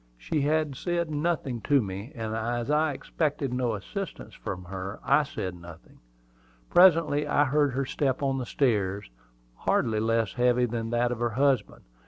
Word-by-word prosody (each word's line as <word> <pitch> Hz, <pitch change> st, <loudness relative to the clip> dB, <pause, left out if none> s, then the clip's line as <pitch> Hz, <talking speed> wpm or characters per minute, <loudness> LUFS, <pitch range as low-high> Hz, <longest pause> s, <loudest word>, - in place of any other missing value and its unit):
She 140 Hz, -, -2 dB
said 155 Hz, +3 st, 0 dB
nothing 150 Hz, -6 st, -1 dB
to 145 Hz, +4 st, +3 dB
me; 100 Hz, +2 st, -5 dB
and 110 Hz, -2 st, -4 dB
as 120 Hz, +3 st, -2 dB
I 155 Hz, +1 st, +3 dB
expected 140 Hz, -2 st, -2 dB
no 125 Hz, -3 st, 0 dB
assistance 190 Hz, -, -6 dB
from 90 Hz, -, -6 dB
her, 95 Hz, +2 st, -6 dB
I 140 Hz, +2 st, +4 dB
said 95 Hz, -10 st, -4 dB
nothing. 85 Hz, -1 st, -13 dB, 0.7 s
Presently 165 Hz, -5 st, +5 dB
I 145 Hz, 0 st, +3 dB
heard 145 Hz, 0 st, +2 dB
her 135 Hz, +1 st, -1 dB
step 135 Hz, 0 st, -1 dB
on 135 Hz, -1 st, 0 dB
the 125 Hz, -, -4 dB
stairs, 100 Hz, -, 0 dB, 0.5 s
hardly 110 Hz, -2 st, +1 dB
less 115 Hz, -2 st, +1 dB
heavy 125 Hz, 0 st, +3 dB
than 115 Hz, -1 st, -3 dB
that 120 Hz, +1 st, +1 dB
of 120 Hz, -, -3 dB
her 120 Hz, 0 st, +1 dB
husband. 135 Hz, -6 st, +1 dB
125 Hz, 160 wpm, -27 LUFS, 110-145 Hz, 0.7 s, Presently